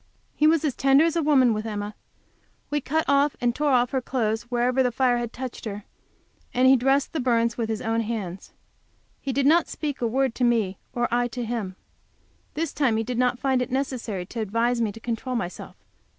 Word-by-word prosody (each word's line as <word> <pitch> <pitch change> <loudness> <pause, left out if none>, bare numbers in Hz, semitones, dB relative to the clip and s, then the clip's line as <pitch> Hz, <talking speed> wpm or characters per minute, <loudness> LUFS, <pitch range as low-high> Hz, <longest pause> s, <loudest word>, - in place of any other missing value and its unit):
He 305 - +4
was 320 0 +3
as 285 - 0
tender 275 +3 +4
as 330 - 0
a 335 - +2
woman 270 -6 +4
with 215 0 -3
Emma; 205 -1 -4 0.8
we 295 0 0
cut 315 +4 0
off 280 +1 +3
and 240 -1 +1
tore 295 +3 0
off 250 -2 +3
her 265 - 0
clothes 235 -2 -2
wherever 250 +1 +1
the 250 -1 +2
fire 245 0 +2
had 235 -1 -4
touched 255 -1 -7
her, 205 -1 -5 0.7
and 255 +1 +4
he 265 - +7
dressed 270 +2 +1
the 320 - -1
burns 235 -2 +1
with 230 -2 -2
his 220 +1 -3
own 225 0 0
hands. 210 -5 -5 0.7
He 275 - -2
did 270 +1 0
not 325 +4 +4
speak 290 -4 -4
a 235 - +2
word 260 +1 +1
to 250 - -3
me, 220 -6 +1
or 240 0 0
I 245 0 +2
to 245 0 -5
him. 220 -5 -4 0.8
This 320 -1 -2
time 260 -7 +1
he 225 - 0
did 245 +1 -3
not 250 -1 +2
find 260 -1 +1
it 250 - -2
necessary 250 -8 -3
to 230 +5 -7
advise 230 +3 0
me 220 -2 0
to 225 - -11
control 240 +2 -3
myself. 180 -6 -5
245 Hz, 215 wpm, -25 LUFS, 225-270 Hz, 0.8 s, he